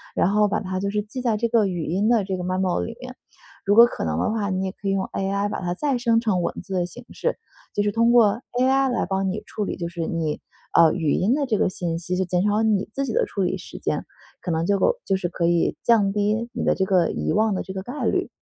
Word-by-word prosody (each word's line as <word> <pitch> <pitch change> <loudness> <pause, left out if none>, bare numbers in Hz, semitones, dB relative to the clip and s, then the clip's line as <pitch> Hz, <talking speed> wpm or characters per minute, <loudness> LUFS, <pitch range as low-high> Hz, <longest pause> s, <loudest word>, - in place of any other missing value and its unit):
然 190 - +2
后 210 0 +3
把 200 - 0
它 185 -2 -3
就 200 +1 -1
是 210 0 -1
记 250 +4 -7
在 230 -4 +1
这 235 - 0
个 225 -3 +3
语 175 -3 -3
音 195 +7 0
的 230 -4 +3
这 190 -1 -3
个 180 - -5
memo 185 0 0
里 230 0 -6
面。 255 0 -9 0.5
如 205 0 +2
果 235 +2 +10
可 240 - -4
能 80 -1 -1
的 - - 0
话， 210 -3 -1
你 190 0 -1
也 190 - -2
可 195 - -8
以 - - +2
用 195 -1 0
AI 200 +1 -1
把 205 - -4
它 175 -1 -2
再 275 +5 0
生 230 -2 +3
成 210 -6 0
文 - - -2
字 190 +1 -7
的 180 -2 +1
形 240 +7 -12
式， - - -2 0.4
就 205 - +2
是 205 - +1
通 230 +2 +3
过 235 -2 +4 0.2
AI 270 +1 +3
来 245 - 0
帮 190 0 -1
你 205 +3 -4
处 210 - -4
理 - - -4
就 170 -2 -3
是 170 -1 -4
你， 160 -3 -2 0.3
呃， 165 -2 +6
语 160 -4 0
音 210 - +2
的 290 -1 0
这 225 -6 0
个 - - +2
信 170 -3 -3
息， 180 +1 -3
就 190 - +1
减 180 0 0
少 210 +1 +2
你 210 -3 +1
自 275 - -1
己 - - -3
的 485 0 +2
处 195 - -2
理 180 - 0
时 - - -10
间， - - -2 0.4
可 180 - -5
能 165 0 0
就 200 +1 +1
够 - - +3
就 195 - +1
是 180 -2 -2
可 170 -1 -2
以 170 0 +1
降 215 -4 +4
低 210 +3 0
你 - - -3
的 - - +3
这 - - 0
个 185 -3 +2
遗 - - -2
忘 215 0 +2
的 190 - -2
这 190 - -7
个 190 - -4
概 250 +7 -6
率。 - - 0
200 Hz, 320 characters per minute, -23 LUFS, 185-225 Hz, 0.5 s, 果